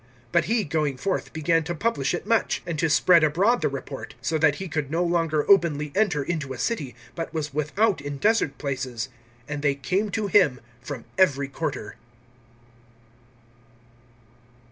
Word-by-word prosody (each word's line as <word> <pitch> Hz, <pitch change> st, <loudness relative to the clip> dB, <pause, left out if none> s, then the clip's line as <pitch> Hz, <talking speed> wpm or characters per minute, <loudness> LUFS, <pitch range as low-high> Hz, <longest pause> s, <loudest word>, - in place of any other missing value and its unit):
(45)But -, -, +4 dB
he, 225 Hz, 0 st, +1 dB
going 150 Hz, -4 st, -1 dB
forth, 195 Hz, +7 st, -2 dB
began 165 Hz, +1 st, +1 dB
to 175 Hz, +3 st, -4 dB
publish 175 Hz, -7 st, 0 dB
it 175 Hz, -, -6 dB
much, 230 Hz, +1 st, +1 dB
and 165 Hz, -3 st, -3 dB
to 165 Hz, -, +2 dB
spread 170 Hz, +2 st, +5 dB
abroad 190 Hz, +11 st, +3 dB
the -, -, +2 dB
report; -, -, -7 dB
so 165 Hz, -, -2 dB
that 150 Hz, -2 st, +4 dB
he 190 Hz, +5 st, -5 dB
could 155 Hz, -4 st, -2 dB
no 165 Hz, +3 st, +1 dB
longer 165 Hz, -3 st, +1 dB
openly 155 Hz, -7 st, +3 dB
enter 185 Hz, -8 st, +1 dB
into 150 Hz, -4 st, -3 dB
a -, -, -8 dB
city, 135 Hz, -, -2 dB, 0.2 s
but 165 Hz, -1 st, -5 dB
was 150 Hz, -3 st, -3 dB
without 155 Hz, +5 st, +1 dB
in 145 Hz, 0 st, -5 dB
desert 210 Hz, -5 st, +2 dB
places. 130 Hz, -4 st, -3 dB, 0.4 s
And 145 Hz, -1 st, -4 dB
they 145 Hz, -1 st, +2 dB
came 185 Hz, +10 st, -1 dB
to 210 Hz, +2 st, -2 dB
him 180 Hz, -10 st, +4 dB, 0.2 s
from -, -, -7 dB
every 140 Hz, -6 st, +3 dB
quarter. 140 Hz, -7 st, -4 dB
160 Hz, 165 wpm, -25 LUFS, 145-185 Hz, 0.4 s, spread